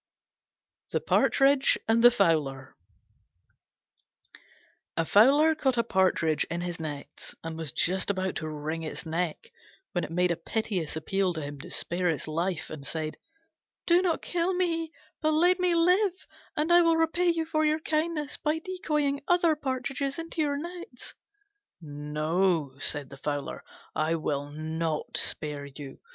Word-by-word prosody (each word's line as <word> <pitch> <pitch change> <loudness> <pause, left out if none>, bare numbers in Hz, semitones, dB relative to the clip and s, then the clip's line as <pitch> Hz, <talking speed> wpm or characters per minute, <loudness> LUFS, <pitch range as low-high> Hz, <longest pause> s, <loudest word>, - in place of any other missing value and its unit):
THE - - 0
PARTRIDGE 275 0 +3
AND 225 +1 +3
THE 240 - +11
FOWLER 155 - 0 2.2
A 165 - +2
Fowler 280 - +6
caught 270 -5 0
a 235 - +3
Partridge 185 -7 +2
in 170 +1 -4
his 175 -1 -4
nets, 150 -3 -7
and 165 0 -5
was 160 -3 -4
just 185 +10 +1
about 190 -1 -1
to 155 - -4
wring 155 +2 -4
its 160 +1 -5
neck 170 - -3 0.4
when 175 - -1
it - - -4
made 180 +2 +2
a - - +1
piteous 180 -2 -2
appeal 185 +4 0
to 160 - -3
him 145 0 -7
to 175 +6 -9
spare 180 0 -1
its 160 -2 -2
life 170 +2 -2
and 155 -3 -7
said, 155 +2 -4 0.7
"Do 345 +1 +5
not 350 -3 0
kill 355 +1 0
me, 330 -3 0 0.3
but 310 -1 +2
let 355 +4 +4
me 360 -1 +2
live 365 +3 +2 0.3
and 310 +3 +2
I 350 - +8
will 330 -1 +4
repay 325 +2 +2
you 330 -1 +1
for 310 -1 0
your 305 +1 +2
kindness 310 -2 -1
by 305 +1 0
decoying 300 -5 -1
other 350 -3 +4
partridges 270 0 -3
into 330 0 -3
your 285 -2 +1
nets." 340 -5 -8 0.7
"No," 150 +1 -1
said 145 -2 -3
the 140 - -9
Fowler, 145 +1 -4 0.3
"I 155 +1 +1
will 145 -3 -2
not 155 +1 -3
spare 150 -2 -3
you. 140 0 -10
190 Hz, 155 wpm, -28 LUFS, -, 2.2 s, THE